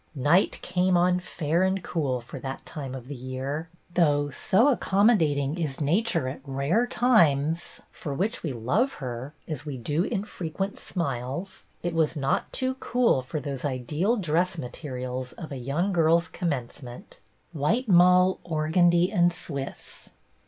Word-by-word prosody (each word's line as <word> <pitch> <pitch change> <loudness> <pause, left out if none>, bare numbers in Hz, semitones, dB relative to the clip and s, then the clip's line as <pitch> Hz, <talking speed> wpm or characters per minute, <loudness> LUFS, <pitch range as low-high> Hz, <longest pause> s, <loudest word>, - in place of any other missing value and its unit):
Night 150 +8 +3
came 180 0 +2
on 180 +1 +3
fair 170 -1 -1
and 190 0 +1
cool 140 -7 -1
for 120 - -9
that 135 0 -6
time 135 -4 -6
of 125 -2 -9
the 145 - -5
year, 130 +5 -4 0.2
though, 145 -4 +2
so 220 - +3
accommodating 185 - +2
is 150 -5 -2
nature 165 - +1
at 135 +1 -5
rare 140 - 0
times 165 - +2
— - - -38
for 150 - -6
which 195 - -1
we 160 - -3
love 150 - 0
her 130 +2 -6
as 150 -3 -4
we 145 -3 -5
do 150 +8 0
infrequent 195 -2 -3
smiles 140 +2 -4
— - - -38
it 175 -1 -1
was 160 -1 +1
not 135 -1 0
too 260 0 -1
cool 245 - +2
for 130 +4 -4
those 140 -2 -5
ideal 150 - 0
dress 175 -1 0
materials 125 -2 -5
of 160 - -9
a 140 - -4
young 150 +10 -1
girl's 165 0 +3
commencement 135 -6 -5 0.2
— - - -41
white 180 - 0
mull, 180 0 +5
organdie, 170 +2 +2
and 175 -3 +4
Swiss. 145 -6 -7
160 Hz, 155 wpm, -26 LUFS, 135-180 Hz, 0.2 s, mull